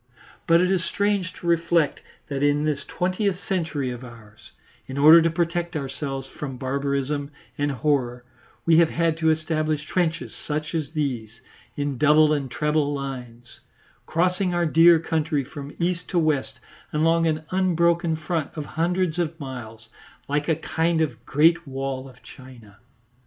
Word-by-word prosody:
But 170 +1 +5
it 180 +1 +2
is 185 -2 +1
strange 200 -2 0
to - - -12
reflect 170 -2 +2 0.3
that 140 -1 -3
in 145 +1 +2
this 150 -2 -1
twentieth 185 +1 -1
century 160 -9 -1
of 125 +1 -7
ours, 115 -3 -14 0.4
in 130 - -6
order 155 +4 +8
to 165 - +2
protect 170 +1 -1
ourselves 135 -1 -4
from 135 -3 -7
barbarism 140 +2 -2 0.3
and 145 0 0
horror, 125 -3 -1 0.4
we 165 -1 +5
have 165 -1 +5
had 165 -1 +1
to 160 -1 +2
establish 155 -1 0
trenches 170 -1 -1
such 155 +1 -4
as 155 -2 -3
these, 130 -8 -2 0.5
in 145 -3 -2
double 150 +1 +5
and 140 -3 -2
treble 150 +1 0
lines, 125 -4 -7 0.5
crossing 180 +2 +1
our 175 0 +2
dear 165 +1 +6
country 155 -2 -1
from 140 +1 -9
east 180 +1 -1
to 180 - -2
west 155 -5 +1 0.4
along 165 +2 +2
an 155 -1 -1
unbroken 170 -3 +2
front 160 -1 -2
of 150 -2 -4
hundreds 175 +1 -1
of 165 -1 -2
miles, 120 -5 -8 0.4
like 145 +2 -1
a 160 - +3
kind 160 +1 0
of 155 - -2
Great 165 +3 +3
Wall 135 0 -4
of 125 -1 -19
China. 115 -5 -14
155 Hz, 155 wpm, -24 LUFS, 140-170 Hz, 0.5 s, order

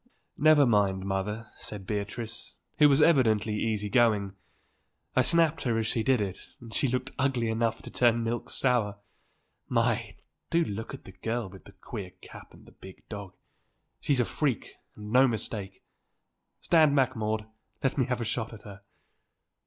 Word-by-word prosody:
"Never 150 -1 +6
mind, 100 -5 +2
mother," 100 +4 -2
said 100 -3 -8
Beatrice, 110 +3 -4 0.2
who 150 -1 +8
was 140 - +5
evidently 110 -9 +3
easy 105 -2 -1
going; 105 -4 +2 0.8
"I - - +5
snapped 165 -2 +3
her 120 -3 0
as 110 - 0
she 110 +1 0
did 130 +1 +3
it 95 -3 -3 0.2
and 115 -2 -11
she 140 - +2
looked 125 +1 -2
ugly 130 -4 +1
enough 115 0 -1
to - - -9
turn 120 -1 +3
milk 115 +1 -3
sour. 115 -6 +1 0.7
My! - - 0 0.3
do 170 0 +3
look 110 -3 -5
at - - -14
that 95 -1 -15
girl 115 -2 -2
with 95 - -14
the 100 - -14
queer 100 -6 -7
cap - - -13
and - - -17
the - - -16
big 95 0 -14
dog. 100 -3 -7 0.6
She's 140 -3 +1
a 125 - +3
freak 125 +3 -2 0.2
and 105 0 -8
no 130 +3 +6
mistake! 105 -4 -4 0.8
Stand 155 -4 +4
back, 130 -2 +2
Maude, 110 0 -1
and 110 +1 -20 0.3
let 135 - +1
me 130 - +3
have 125 -1 -2
a - - -2
shot 115 0 -3
at 105 -2 -11
her." 100 -1 -11
115 Hz, 175 wpm, -28 LUFS, 105-125 Hz, 0.8 s, who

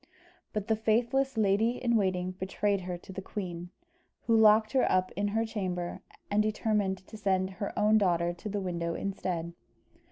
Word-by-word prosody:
But 210 -1 -3
the 220 - +3
faithless 235 +4 +1
lady 215 +2 +3
in 235 -2 +1
waiting 185 -3 +1
betrayed 190 +2 -1
her 180 -1 -4
to 190 - -12
the 195 - -5
queen, 175 -3 -6 0.5
who 230 - +2
locked 215 0 +6
her 265 - +2
up 185 0 +2
in 205 +1 -1
her 225 +2 0
chamber, 185 -5 -3 0.3
and 205 +1 +4
determined 210 -3 0
to 220 - -10
send 190 -2 0
her 195 +2 -4
own 215 +1 +4
daughter 175 -3 +1
to 195 +5 -7
the 205 0 -2
window 170 -2 -2
instead. 175 -4 -3
200 Hz, 170 wpm, -30 LUFS, 185-215 Hz, 0.5 s, locked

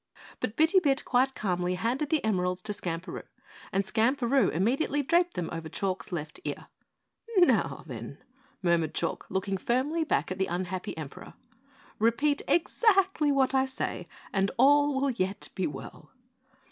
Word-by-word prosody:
But 230 -3 -3
Bitty 320 +6 +5
Bit 280 -6 +1
quite 260 +2 +2
calmly 180 -2 -1
handed 245 +9 -1
the 315 - +1
emeralds 180 -3 0
to 210 - -3
Skamperoo, 175 -2 -4 0.5
and 195 - +1
Skamperoo 245 +4 +2
immediately 270 - +1
draped 345 +4 +2
them 175 - -2
over 165 -1 -5
Chalk's 195 +1 -3
left 165 - -5
ear. - - -5 0.7
"Now, 355 -2 +3
then," - - -7 0.5
murmured 170 -3 +1
Chalk, 165 - -2
looking 195 +1 -1
firmly 270 - 0
back 315 - 0
at 185 - -4
the 190 - +1
unhappy 180 0 -4
Emperor, 150 -3 -8 0.6
"repeat 280 +7 +2
exactly 380 -4 +3
what 270 -1 +2
I 265 0 +3
say 260 - -4 0.3
and 195 0 +2
all 285 +2 +5
will 275 0 +1
yet 195 -4 -2
be 190 - -1
well." 135 -2 -9
230 Hz, 145 wpm, -28 LUFS, 185-285 Hz, 0.7 s, Bitty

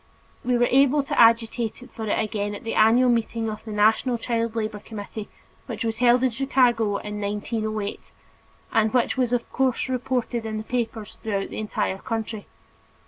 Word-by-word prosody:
We 245 0 +2
were 240 - +4
able 275 +2 +4
to 275 - +1
agitate 230 +1 +3
for 220 -2 -5
it - - +1
again 205 -1 -2
at - - -9
the 225 - -3
annual 230 +4 +5
meeting 230 -1 -1
of 215 - -8
the 220 - -7
National 220 +4 +3
Child 230 -1 -2
Labor 215 -2 -2
Committee 210 0 -8 0.4
which - - -4
was 225 -1 -1
held 245 +1 +5
in 260 - +3
Chicago 240 -4 +2
in 210 0 -6
1908, 210 0 -3 0.6
and 220 -1 +3
which 245 - +2
was 250 -2 +1
of 245 -1 0
course 260 -1 +1
reported 250 -2 -1
in 215 -1 -4
papers 230 -3 -4
throughout 200 -3 -2
the - - -5
entire 210 -2 -2
country. 225 -2 -4
225 Hz, 170 wpm, -24 LUFS, 215-245 Hz, 0.6 s, annual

